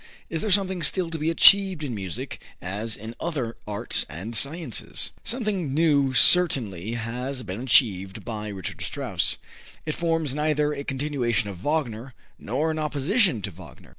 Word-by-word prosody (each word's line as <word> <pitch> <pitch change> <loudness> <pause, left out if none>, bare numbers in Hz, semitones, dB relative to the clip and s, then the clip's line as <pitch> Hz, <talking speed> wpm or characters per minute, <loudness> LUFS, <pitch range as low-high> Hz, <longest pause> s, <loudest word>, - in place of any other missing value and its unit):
Is 165 - -2
there 215 - -2
something 190 -2 +2
still 170 +2 +1
to 165 - -4
be 155 +2 0
achieved 190 0 +6
in 135 -4 -3
music 95 -6 -5 0.2
as 105 +5 -2
in 110 +2 -8
other 135 -9 -3
arts 105 -1 +1
and 95 +10 -6
sciences?" 140 - -1
Something 205 - -1
new 145 -4 +3
certainly 120 - +4
has 125 +3 -4
been 100 +1 -6
achieved 100 -7 +2
by 110 -2 -5
Richard 95 -4 -6
Strauss. - - -2 0.5
It 155 - -2
forms 165 -4 0
neither 150 0 +1
a 140 -1 -5
continuation 130 -6 -1
of 95 - -9
Wagner 130 -5 -2 0.2
nor 145 +9 -1
an 155 - -3
opposition 155 - +1
to 100 - -3
Wagner. 85 -2 -14
135 Hz, 155 wpm, -25 LUFS, 110-160 Hz, 0.5 s, achieved